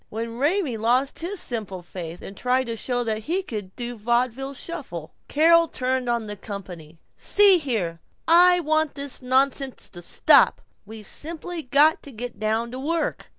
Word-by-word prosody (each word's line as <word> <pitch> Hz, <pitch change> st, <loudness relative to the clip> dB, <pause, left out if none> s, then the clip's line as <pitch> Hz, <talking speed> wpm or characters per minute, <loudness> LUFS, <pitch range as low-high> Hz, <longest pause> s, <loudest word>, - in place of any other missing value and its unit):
Even 230 Hz, +2 st, -5 dB
Raymie 295 Hz, -, +1 dB
lost 245 Hz, +5 st, +1 dB
his 365 Hz, +4 st, -3 dB
simple 200 Hz, -7 st, -4 dB
faith, 175 Hz, -1 st, -8 dB
and 195 Hz, -, -9 dB
tried 250 Hz, +4 st, +1 dB
to 230 Hz, -1 st, -4 dB
show 245 Hz, +2 st, -2 dB
that 220 Hz, -2 st, -2 dB
he 370 Hz, +4 st, -1 dB
could 205 Hz, -, -7 dB
do 240 Hz, -1 st, -4 dB
a -, -, -12 dB
vaudeville 245 Hz, +4 st, -1 dB
shuffle. 255 Hz, -, -6 dB
Carol 335 Hz, +2 st, +5 dB
turned 255 Hz, -3 st, -2 dB
on 235 Hz, -2 st, 0 dB
the 210 Hz, 0 st, -6 dB
company. 180 Hz, -6 st, -9 dB, 0.2 s
"See 400 Hz, -3 st, +6 dB
here, 195 Hz, -, -2 dB, 0.3 s
I 355 Hz, +2 st, +6 dB
want 310 Hz, -1 st, +1 dB
this 280 Hz, -2 st, -2 dB
nonsense 265 Hz, +1 st, 0 dB
to 175 Hz, -, -11 dB
stop. -, -, +4 dB, 0.3 s
We've 220 Hz, -1 st, -10 dB
simply 330 Hz, -, -5 dB
got 290 Hz, +3 st, +3 dB
to 285 Hz, -, -10 dB
get 245 Hz, +1 st, -7 dB
down 220 Hz, +2 st, -1 dB
to 255 Hz, -, -6 dB
work." 330 Hz, +5 st, -2 dB
250 Hz, 170 wpm, -24 LUFS, 215-305 Hz, 0.3 s, See